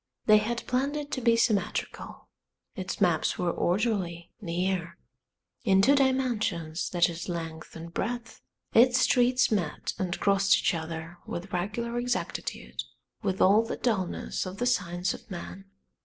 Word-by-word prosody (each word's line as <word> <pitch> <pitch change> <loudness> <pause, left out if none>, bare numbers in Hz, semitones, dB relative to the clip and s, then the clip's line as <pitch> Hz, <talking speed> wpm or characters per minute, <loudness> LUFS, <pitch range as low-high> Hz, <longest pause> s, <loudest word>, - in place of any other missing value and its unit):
They 215 -1 +7
had 235 +2 -3
planned 275 +4 0
it 295 -1 -5
to 260 - -2
be 230 -1 +4
symmetrical, 220 -3 -1 0.5
its 185 0 -4
maps 175 -6 +2
were 175 -1 0
orderly, 175 -4 -1
near; 180 -1 -2 0.7
in 190 -1 +4
two 275 - +6
dimensions, 235 - +1
that 175 -1 +3
is 170 +1 -6
length 165 -2 -5
and 165 +1 -8
breadth, 235 +2 -4 0.3
its 250 +2 +6
streets 250 +1 +3
met 175 -8 -1
and 180 -1 -2
crossed 195 0 +4
each - - +1
other 165 +1 -5
with 180 +3 -6
regular 235 +7 -2
exactitude, 245 0 -3 0.4
with 190 -3 -1
all 200 +4 +6
the 225 - -4
dullness 195 -5 -1
of 185 +1 -7
the 245 - -1
science 180 -6 0
of - - -12
man. 190 +1 -7
195 Hz, 145 wpm, -28 LUFS, 175-235 Hz, 0.7 s, They